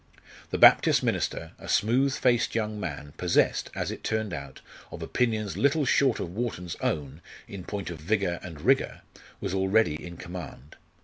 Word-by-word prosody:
The -, -, -2 dB
Baptist -, -, +6 dB
minister, 80 Hz, -, -1 dB
a -, -, -10 dB
smooth 130 Hz, +5 st, +2 dB
faced 120 Hz, -3 st, +2 dB
young 105 Hz, -2 st, -1 dB
man, 75 Hz, -5 st, -6 dB
possessed, 90 Hz, -1 st, +2 dB
as -, -, -2 dB
it -, -, -8 dB
turned 110 Hz, -4 st, -1 dB
out, 70 Hz, -4 st, -7 dB, 0.3 s
of -, -, -7 dB
opinions 110 Hz, -5 st, -1 dB
little 140 Hz, +2 st, +2 dB
short 135 Hz, -2 st, +3 dB
of 85 Hz, -, -4 dB
Wharton's 95 Hz, -6 st, -3 dB
own 75 Hz, 0 st, -2 dB, 0.3 s
in 100 Hz, -3 st, -8 dB
point 100 Hz, -2 st, -5 dB
of 85 Hz, -, -7 dB
vigour 90 Hz, 0 st, 0 dB
and 80 Hz, -5 st, -9 dB
rigour, 135 Hz, -, +2 dB, 0.4 s
was -, -, -3 dB
already 95 Hz, -4 st, +2 dB
in 85 Hz, -1 st, -8 dB
command. 85 Hz, -5 st, -9 dB
95 Hz, 165 wpm, -27 LUFS, 85-115 Hz, 0.4 s, Baptist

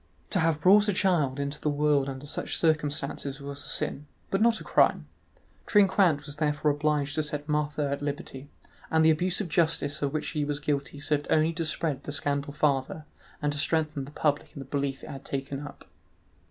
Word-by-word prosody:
To 190 Hz, -, +2 dB
have 160 Hz, -2 st, +2 dB
brought 205 Hz, +6 st, +6 dB
a 205 Hz, -, +2 dB
child 165 Hz, -8 st, +1 dB
into 140 Hz, +1 st, -3 dB
the 150 Hz, -, +1 dB
world 145 Hz, -1 st, +2 dB
under 135 Hz, +1 st, -7 dB
such 145 Hz, -, -2 dB
circumstances 145 Hz, -3 st, -1 dB
was 140 Hz, 0 st, -6 dB
a -, -, -6 dB
sin, 145 Hz, +1 st, -2 dB, 0.2 s
but 195 Hz, -, +1 dB
not 230 Hz, -1 st, +4 dB
a -, -, -9 dB
crime; -, -, +3 dB, 0.6 s
Trinquant 190 Hz, -7 st, +4 dB
was 145 Hz, -1 st, -6 dB
therefore 150 Hz, -1 st, +1 dB
obliged 150 Hz, 0 st, 0 dB
to 155 Hz, -, +1 dB
set 150 Hz, -1 st, -3 dB
Marthe 150 Hz, -1 st, -1 dB
at 140 Hz, -1 st, -1 dB
liberty, 145 Hz, -1 st, -5 dB, 0.4 s
and 160 Hz, 0 st, +3 dB
the 160 Hz, -, +7 dB
abuse 180 Hz, +5 st, 0 dB
of 200 Hz, -, -3 dB
justice 160 Hz, -3 st, 0 dB
of 140 Hz, -1 st, 0 dB
which 155 Hz, 0 st, -2 dB
he 150 Hz, -2 st, -1 dB
was 145 Hz, 0 st, -2 dB
guilty 145 Hz, -1 st, -2 dB
served 145 Hz, 0 st, -1 dB
only 160 Hz, +1 st, +3 dB
to 165 Hz, +1 st, -2 dB
spread 155 Hz, -2 st, -1 dB
the -, -, -5 dB
scandal 145 Hz, 0 st, -1 dB
farther 145 Hz, +1 st, 0 dB, 0.4 s
and 145 Hz, 0 st, +1 dB
to 145 Hz, -, -2 dB
strengthen 155 Hz, -3 st, 0 dB
the 140 Hz, -, -11 dB
public 150 Hz, -1 st, -1 dB
in -, -, -7 dB
the 135 Hz, -, -7 dB
belief 140 Hz, 0 st, -2 dB
it -, -, -9 dB
had 135 Hz, 0 st, -8 dB
taken 135 Hz, 0 st, -4 dB
up. 145 Hz, 0 st, -10 dB
150 Hz, 205 wpm, -28 LUFS, 140-160 Hz, 0.6 s, the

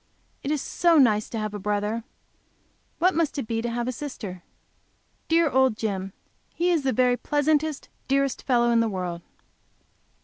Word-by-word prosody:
If 275 Hz, -, -4 dB
it -, -, +2 dB
is 290 Hz, -, -4 dB
so 340 Hz, -2 st, +3 dB
nice 215 Hz, -6 st, +4 dB
to 230 Hz, -, -5 dB
have 215 Hz, -1 st, -3 dB
a 205 Hz, -, -4 dB
brother, 210 Hz, +3 st, -1 dB, 0.9 s
what 365 Hz, +3 st, +3 dB
must 320 Hz, -3 st, 0 dB
it 275 Hz, -, -2 dB
be 225 Hz, 0 st, -2 dB
to 240 Hz, -, -2 dB
have 235 Hz, +1 st, -2 dB
a -, -, 0 dB
sister! 225 Hz, -9 st, -7 dB, 0.9 s
Dear 330 Hz, 0 st, +4 dB
old 265 Hz, -4 st, +2 dB
Jim! 195 Hz, -4 st, -3 dB, 0.4 s
He 350 Hz, +1 st, +1 dB
is 335 Hz, -3 st, +2 dB
the 270 Hz, -1 st, 0 dB
very 250 Hz, +1 st, +2 dB
pleasantest, 295 Hz, +1 st, 0 dB, 0.2 s
dearest 275 Hz, 0 st, +1 dB
fellow 240 Hz, -2 st, +2 dB
in 230 Hz, -, +4 dB
the 230 Hz, -1 st, +2 dB
world! 180 Hz, -3 st, -4 dB
245 Hz, 175 wpm, -25 LUFS, 215-290 Hz, 0.9 s, nice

